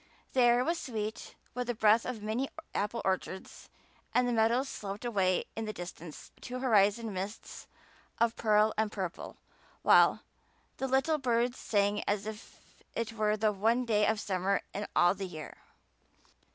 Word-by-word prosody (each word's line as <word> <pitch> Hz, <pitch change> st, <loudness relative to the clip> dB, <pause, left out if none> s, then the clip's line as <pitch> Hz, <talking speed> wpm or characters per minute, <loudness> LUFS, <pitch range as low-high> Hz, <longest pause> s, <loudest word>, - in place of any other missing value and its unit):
The 260 Hz, -, +3 dB
air 240 Hz, +1 st, +5 dB
was 335 Hz, +1 st, 0 dB
sweet 220 Hz, -3 st, -5 dB, 0.2 s
with 250 Hz, 0 st, -3 dB
the 240 Hz, -, -1 dB
breath 220 Hz, +1 st, +4 dB
of 235 Hz, -4 st, -5 dB
many 230 Hz, +6 st, -1 dB, 0.2 s
apple 210 Hz, +3 st, -2 dB
orchards 190 Hz, 0 st, -3 dB, 0.5 s
and 250 Hz, 0 st, +4 dB
the 245 Hz, -, 0 dB
meadows 230 Hz, +4 st, +2 dB
sloped 205 Hz, -1 st, -6 dB
away 190 Hz, -6 st, +1 dB
in 225 Hz, -, -3 dB
the 215 Hz, -, -4 dB
distance 175 Hz, -4 st, -9 dB
to 250 Hz, -, -5 dB
horizon 220 Hz, -3 st, +2 dB
mists 195 Hz, +3 st, -6 dB, 0.5 s
of 235 Hz, 0 st, +2 dB
pearl 215 Hz, -1 st, +3 dB
and 220 Hz, -1 st, +1 dB
purple; 185 Hz, -5 st, -5 dB, 0.5 s
while -, -, +5 dB, 0.5 s
"The 265 Hz, -, -2 dB
little 270 Hz, +4 st, +2 dB
birds 245 Hz, -1 st, 0 dB
sang 205 Hz, -1 st, +1 dB
as 205 Hz, 0 st, 0 dB
if 215 Hz, 0 st, -9 dB, 0.4 s
it 230 Hz, -1 st, -2 dB
were 215 Hz, -1 st, +1 dB
The 215 Hz, 0 st, +2 dB
one 225 Hz, +5 st, +1 dB
day 210 Hz, -3 st, +2 dB
of 220 Hz, -1 st, +1 dB
summer 195 Hz, 0 st, 0 dB
in 205 Hz, +1 st, -4 dB
all 175 Hz, +1 st, +5 dB
the 195 Hz, -1 st, -5 dB
year." 155 Hz, -4 st, -9 dB
215 Hz, 160 wpm, -31 LUFS, 200-240 Hz, 0.5 s, air